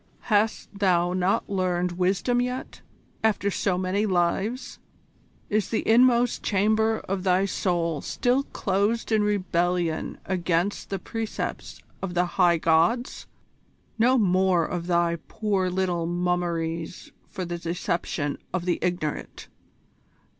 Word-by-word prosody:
Hast 210 -1 0
thou 180 -3 +2
not 185 +1 +1
learned 180 -2 0
wisdom 190 +7 +1
yet, 250 +1 -4 0.4
after 205 -2 +1
so 185 -1 0
many 190 +3 0
lives? 190 +7 -1 0.7
Is 210 0 0
the 225 - -1
inmost 240 +1 +4
chamber 220 +2 +1
of 195 0 -3
thy 185 +1 +2
soul 170 -6 -1
still 250 +2 +1
closed 205 +5 -1
in 215 -1 +3
rebellion 180 -5 0
against 180 +1 -1
the 195 - -2
precepts 225 +4 -5 0.2
of 180 -2 -4
the 175 +1 +3
High 175 -1 +3
Gods? 165 +10 +1 0.7
No 250 +3 +4
more 185 -4 +3
of 175 0 -4
thy 170 -1 +2
poor 200 -4 0
little 180 -2 -1
mummeries 175 -1 -2 0.2
for 185 -3 -5
the 175 0 -4
deception 170 -3 -2
of 180 -1 -2
the 180 - 0
ignorant! 175 -4 -3
185 Hz, 120 wpm, -25 LUFS, 175-210 Hz, 0.7 s, inmost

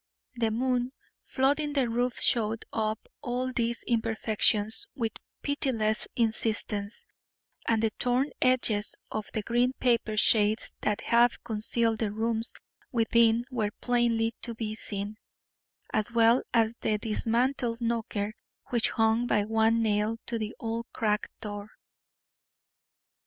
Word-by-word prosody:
The 235 -2 0
moon 250 +2 0 0.3
flooding 290 +2 +1
the 270 -4 +2
roof 245 +2 -1
showed 225 -1 +1
up 220 0 -2
all 255 +1 -2
these 235 -1 -1
imperfections 220 - +2
with 230 -4 -1 0.3
pitiless 230 -7 +1
insistence, 220 -2 0 0.6
and 225 -1 +2
the 220 - +2
torn 250 +3 +1
edges 235 -5 +2 0.2
of 215 -2 -3
the 215 - -1
green 240 +3 +1
paper 230 -4 +1
shades 215 0 +2
that 210 -1 0
half 235 0 +3
concealed 225 +1 +1
the 215 -3 -1
rooms 225 +1 0 0.4
within 230 0 +3
were 220 -5 0
plainly 235 -2 +1
to 235 -2 -5
be 220 -1 -3
seen, 205 -1 -4 0.8
as 215 +2 +1
well 230 +1 +5
as 225 -1 +3
the 215 - +1
dismantled 230 +2 0
knocker 225 -3 -2 0.4
which 235 -2 +2
hung 225 +2 +2
by 210 -3 +2
one 225 +1 +2
nail 210 +1 +1
to 230 -1 -2
the 215 0 -4
old 230 +1 -3
cracked 210 -3 0
door. 205 -1 -6
225 Hz, 125 wpm, -28 LUFS, 215-240 Hz, 0.8 s, well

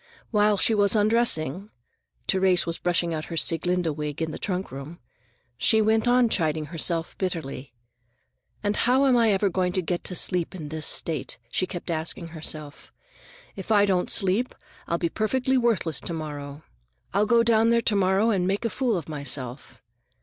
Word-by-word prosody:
While 210 -1 +3
she 225 - +4
was 205 0 +3
undressing—Therese 190 - 0
was 170 0 -4
brushing 170 -1 0
out 155 -1 -4
her 165 - -6
Sieglinde 170 -1 +1
wig 150 -1 -5
in 160 -1 -2
the - - -7
trunk 185 -1 -3
room—she 125 - -4
went 220 +1 +2
on 245 0 +4
chiding 160 -7 0
herself 165 0 -2
bitterly. 155 -8 -4 0.9
"And 205 0 0
how 260 +3 +3
am 260 -2 +4
I 230 -2 +4
ever 200 +1 +2
going 180 -1 -1
to 185 - 0
get 175 +1 -2
to 180 - -2
sleep 180 0 +1
in 155 -5 -7
this 155 0 -1
state?" 160 -4 +1
she 185 - 0
kept 175 -1 -6
asking 165 +1 -2
herself. 155 -2 -7 0.6
"If 195 +2 -7
I 205 -1 +5
don't 185 -3 0
sleep, 200 +6 +1 0.3
I'll 170 - 0
be 170 - 0
perfectly 255 +8 0
worthless 230 -10 +1
to 170 - -5
morrow. 145 -2 -7 0.5
I'll 205 +2 +2
go 235 +1 +4
down 230 -1 +3
there 235 0 +3
to 220 - 0
morrow 195 +3 +2
and 185 -4 0
make 200 +4 -1
a 230 - -1
fool 245 -6 0
of 165 - -6
myself. 140 -4 -5
180 Hz, 170 wpm, -25 LUFS, 160-210 Hz, 0.9 s, I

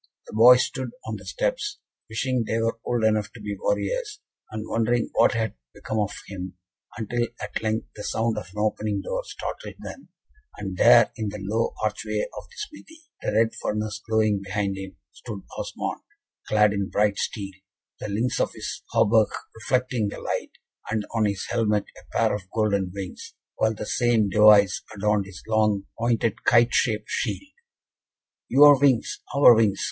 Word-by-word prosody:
The - - -12
boys 125 +3 +7
stood - - -5 0.2
on - - -4
the - - -13
steps, - - -2 0.3
wishing 120 +1 -1
they 110 - 0
were 115 0 -1
old 120 -2 -1
enough 110 -1 +2
to - - -11
be - - -4
warriors, - - -1 0.3
and 110 0 -6
wondering 115 +1 0
what - - +4
had 110 -1 -1 0.2
become 110 - -3
of 105 -2 0 0.2
him, 95 -2 -7 0.4
until 120 +2 -1
at - - -4
length 110 0 -1
the 105 - -7
sound 115 +2 0
of 90 - -10
an 105 - -14
opening 105 -1 -1
door - - -2
startled - - -7
them, - - -10 0.5
and 95 -2 -5
there, 120 +4 +6
in 110 -3 -2
the 105 - -6
low 105 +4 -1
archway - - -2
of - - -7
the 475 - -20
smithy, 320 -6 -9 0.2
the - - -1
red 110 +1 +3
furnace 105 0 -2
glowing 110 -2 +2
behind 100 0 -2
him, 95 -1 -8 0.2
stood 105 -4 -8
Osmond, - - -4 0.5
clad 105 -1 +4
in 100 -1 -2
bright 105 -1 +1
steel, 100 -3 -3 0.5
the 105 - -5
links 115 +5 -1
of - - 0
his - - -6
hauberk 110 0 +4 0.2
reflecting 125 -1 0
the 100 - -6
light, - - -3 0.4
and 110 -1 -1
on 110 -2 +2
his 100 -2 -2
helmet 105 -3 +1
a - - -8
pair 110 -1 +3
of 100 -2 -5
golden 100 -4 +1
wings, 95 -1 -8 0.2
while 110 0 +1
the 105 - -5
same 115 -2 +2
device 105 -1 +6
adorned 105 -1 +1
his 95 -1 -11
long 105 -2 +2 0.2
pointed 115 -2 0
kite 120 0 +4
shaped 110 -2 +1
shield. 290 - -3 1.0
"Your 145 0 +8
wings! 135 -5 +2 0.2
our 140 -3 +8
wings!" 110 -4 +2
110 Hz, 170 wpm, -25 LUFS, 105-120 Hz, 1.0 s, Your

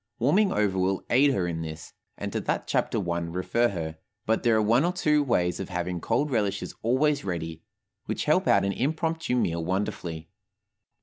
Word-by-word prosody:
Warming 185 - +3
over 100 -3 +1
will 95 +1 0
aid 140 +4 +5
her 95 -9 0
in 80 -1 -3
this, 80 0 -7 0.2
and - - -5
to - - 0
that - - -1
chapter 85 - 0
I 85 - 0
refer 90 +7 0
her; 80 -6 -5 0.3
but 110 +1 +1
there 115 -2 +3
are 110 - +3
one 115 +6 +4
or 175 - +2
two 150 -5 +2
ways 90 -11 +1
of 95 - -5
having 90 -1 -3
cold 140 +6 0
relishes 100 -4 -1
always 140 +5 +2
ready, 80 -3 -4 0.5
which - - -2
help - - +2
out 100 -1 +4
an 100 - +1
impromptu 160 +2 -1
meal 85 -9 0
wonderfully. 90 -3 -3
100 Hz, 185 wpm, -27 LUFS, 85-130 Hz, 0.5 s, aid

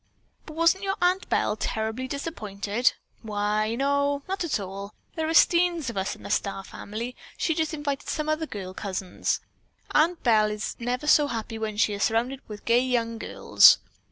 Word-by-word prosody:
"But 310 - -8
wasn't 335 +4 +3
your 390 0 0
Aunt 365 +2 +1
Belle 210 - +1
terribly 220 +4 -3
disappointed?" 225 - -1 0.3
"Why, 215 +1 -1
no; 280 +2 +1
not 385 0 -2
at 320 -9 0
all. 200 +1 -7 0.2
There 320 -1 -1
are 325 - 0
steens 340 -7 +4
of - - -13
us 190 0 -2
in - - -16
the - - -6
Starr 195 -1 -1
family. 230 +6 -6 0.2
She 325 - +1
just 315 0 -1
invited 290 -2 -3
some 305 -1 -2
other 310 +1 0
girl 190 -6 -6
cousins. 190 -2 -2 0.5
Aunt 330 +3 +2
Belle 215 -3 +4
is 210 0 -4
never 245 +4 -2
so 300 -1 +5
happy 225 -2 -4
as - - -9
when 215 -1 -3
she 210 -1 +3
is 200 - -5
surrounded 245 +6 0
with 210 -1 -9
gay 235 +1 +4
young 230 -3 -1
girls. - - +6
240 Hz, 185 wpm, -26 LUFS, 210-310 Hz, 0.5 s, girls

